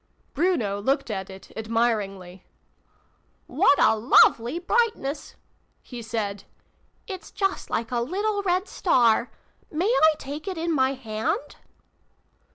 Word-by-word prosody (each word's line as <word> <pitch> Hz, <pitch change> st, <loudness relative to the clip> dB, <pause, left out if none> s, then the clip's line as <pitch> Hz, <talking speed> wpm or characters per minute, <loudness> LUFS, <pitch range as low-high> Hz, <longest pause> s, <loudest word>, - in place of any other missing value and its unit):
Bruno 255 Hz, -, 0 dB
looked 265 Hz, +1 st, 0 dB
at 190 Hz, -2 st, -4 dB
it 190 Hz, 0 st, -12 dB
admiringly. 210 Hz, -5 st, -2 dB, 0.5 s
" -, -, -40 dB, 0.2 s
What 285 Hz, -, +3 dB
a -, -, +5 dB
lovely 235 Hz, +4 st, +4 dB
brightness! 355 Hz, -7 st, -1 dB, 0.2 s
" -, -, -43 dB
he 245 Hz, -1 st, -6 dB
said. 215 Hz, -3 st, -4 dB, 0.3 s
" -, -, -43 dB, 0.3 s
It's 380 Hz, -3 st, -7 dB
just 390 Hz, -1 st, -2 dB
like 225 Hz, +1 st, -2 dB
a 240 Hz, -, 0 dB
little 405 Hz, -, -1 dB
red 370 Hz, +1 st, 0 dB
star! 240 Hz, -, +2 dB, 0.4 s
May 320 Hz, +4 st, -1 dB
I 405 Hz, -9 st, +4 dB
take 295 Hz, +6 st, -7 dB
it 375 Hz, -3 st, -3 dB
in 335 Hz, +1 st, -1 dB
my 265 Hz, -2 st, +2 dB
hand 225 Hz, +3 st, -3 dB
260 Hz, 135 wpm, -25 LUFS, 220-350 Hz, 0.5 s, a